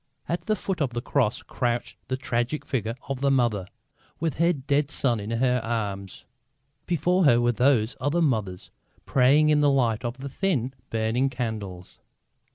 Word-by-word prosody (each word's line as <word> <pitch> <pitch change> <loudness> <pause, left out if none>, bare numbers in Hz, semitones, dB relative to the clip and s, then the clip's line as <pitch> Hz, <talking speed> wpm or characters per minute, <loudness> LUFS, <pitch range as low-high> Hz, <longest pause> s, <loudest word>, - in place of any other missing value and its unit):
At 170 - -1
the 215 - +2
foot 190 -5 -3
of 130 -4 0
the 120 - -2
Cross 120 -6 0
crouched 120 -2 -2
the 130 - -1
tragic 120 +3 -2
figure 115 -3 -2
of 135 -1 -4
the 140 - +3
Mother, 120 -8 +1 0.5
with 160 -4 -2
her 170 +2 +4
dead 145 -1 0
Son 125 -6 +1
in 105 +1 -6
her 125 +1 +1
arms. 100 -4 -4 0.6
Before 175 +2 +2
her 120 -4 +6
were 120 0 +3
these 120 -2 +2
other 145 +6 +1
mothers, 110 - -1 0.3
praying 140 +4 +4
in 150 -1 +4
the 145 - +4
light 120 -5 +1
of 120 +1 -3
the 135 +1 -6
thin 135 - -1 0.2
burning 115 +4 +1
candles. 110 -8 -5
125 Hz, 165 wpm, -26 LUFS, 115-145 Hz, 0.6 s, her